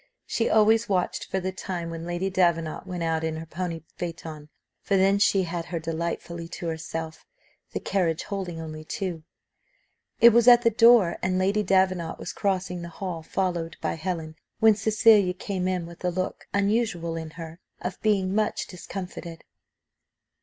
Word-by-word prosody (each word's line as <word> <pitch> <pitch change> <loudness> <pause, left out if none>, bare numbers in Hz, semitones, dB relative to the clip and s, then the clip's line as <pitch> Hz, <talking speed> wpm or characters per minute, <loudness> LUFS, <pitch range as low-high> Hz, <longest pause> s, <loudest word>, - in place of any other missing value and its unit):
She 230 - 0
always 220 +1 +4
watched 185 -3 0
for 190 - 0
the 185 0 -2
time 180 -2 -5
when 165 0 -6
Lady 175 +2 -2
Davenant 170 -4 +1
went 180 -2 -4
out 160 -1 0
in 160 -1 -1
her 160 +1 -6
pony 165 0 -4
phaeton, 160 -3 -6 0.3
for 200 - +1
then 195 +1 +4
she 200 -1 +4
had 170 -1 -4
her 170 - -4
delightfully 170 +1 -4
to 170 +1 -7
herself, 160 0 -5 0.5
the - - -1
carriage 170 -5 0
holding 185 -5 -4
only 155 -1 -7
two. 175 0 -4 1.0
It 235 - +10
was 235 +1 +4
at 240 -1 +8
the 230 - +4
door, 230 -5 +6
and 185 0 0
Lady 195 +3 +2
Davenant 185 -3 +1
was - - -6
crossing 190 -3 -1
the 170 - -6
hall 170 -1 -5
followed 170 -1 -2
by - - -1
Helen, 160 -2 -4 0.2
when 220 0 +7
Cecilia 210 -3 +4
came 185 -1 -3
in 180 -2 -1
with 170 +1 -12
a 180 - +2
look, 185 +1 -4
unusual 200 -5 0
in 160 -1 -5
her, 165 0 -8 0.2
of 180 - -5
being 195 -3 +2
much 215 0 0
discomfited. 180 -2 -8
180 Hz, 165 wpm, -26 LUFS, 165-195 Hz, 1.0 s, It